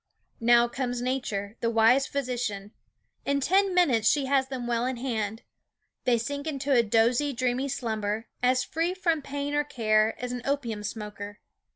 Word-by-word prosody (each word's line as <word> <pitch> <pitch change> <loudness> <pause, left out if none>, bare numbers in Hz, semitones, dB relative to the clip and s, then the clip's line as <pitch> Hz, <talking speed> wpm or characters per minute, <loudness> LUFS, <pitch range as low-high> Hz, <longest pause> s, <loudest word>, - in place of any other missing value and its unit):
Now 235 +1 +5
comes 245 0 -3
Nature, 240 -5 -3
the 230 - 0
wise 230 +4 +4
physician. 245 -7 -3 0.5
In 280 0 +1
ten 385 +7 +3
minutes 245 -12 +4
she 285 -2 +2
has 265 -1 +2
them 260 -2 -5
well 235 -1 0
in 260 -1 -2
hand. 225 -3 -3 0.6
They 245 -2 +4
sink 285 +6 -4
into 280 -2 -2
a 240 - +6
dozy, 235 +6 +2
dreamy 255 +2 -1
slumber, 220 -3 -2 0.2
as 250 0 +3
free 335 +3 -1
from 335 -4 0
pain 285 +1 -4
or 295 0 +2
care 220 -5 +1
as 250 0 -4
an 250 0 -4
opium 245 -6 -2
smoker. 205 -1 -6
245 Hz, 165 wpm, -27 LUFS, 225-280 Hz, 0.6 s, a